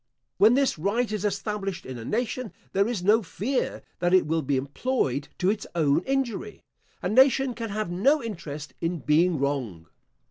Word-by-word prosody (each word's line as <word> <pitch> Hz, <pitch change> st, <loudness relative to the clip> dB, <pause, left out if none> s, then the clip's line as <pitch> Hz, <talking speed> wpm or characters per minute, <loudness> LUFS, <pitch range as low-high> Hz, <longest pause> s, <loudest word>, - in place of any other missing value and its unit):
When 220 Hz, +4 st, +6 dB
this 275 Hz, -, +1 dB
right 215 Hz, +7 st, 0 dB
is 215 Hz, -2 st, -2 dB
established 200 Hz, -2 st, -2 dB
in 130 Hz, -2 st, -7 dB
a -, -, -7 dB
nation, 240 Hz, -, -2 dB, 0.2 s
there 200 Hz, +2 st, +3 dB
is 225 Hz, -7 st, -2 dB
no 215 Hz, +4 st, +5 dB
fear 225 Hz, +7 st, -2 dB, 0.2 s
that 175 Hz, +1 st, +3 dB
it 185 Hz, -, +4 dB
will 160 Hz, +1 st, 0 dB
be 140 Hz, -1 st, 0 dB
employed 140 Hz, -, -1 dB
to 185 Hz, +1 st, +2 dB
its 215 Hz, -1 st, -4 dB
own 150 Hz, -3 st, +3 dB
injury. 245 Hz, -6 st, -2 dB, 0.4 s
A -, -, +1 dB
nation 265 Hz, +3 st, +4 dB
can 230 Hz, -1 st, -5 dB
have 210 Hz, -2 st, -3 dB
no 270 Hz, -, +3 dB
interest 150 Hz, -9 st, -6 dB
in 170 Hz, +1 st, -1 dB
being 160 Hz, +4 st, +3 dB
wrong. 130 Hz, -, -2 dB
195 Hz, 175 wpm, -26 LUFS, 155-230 Hz, 0.4 s, When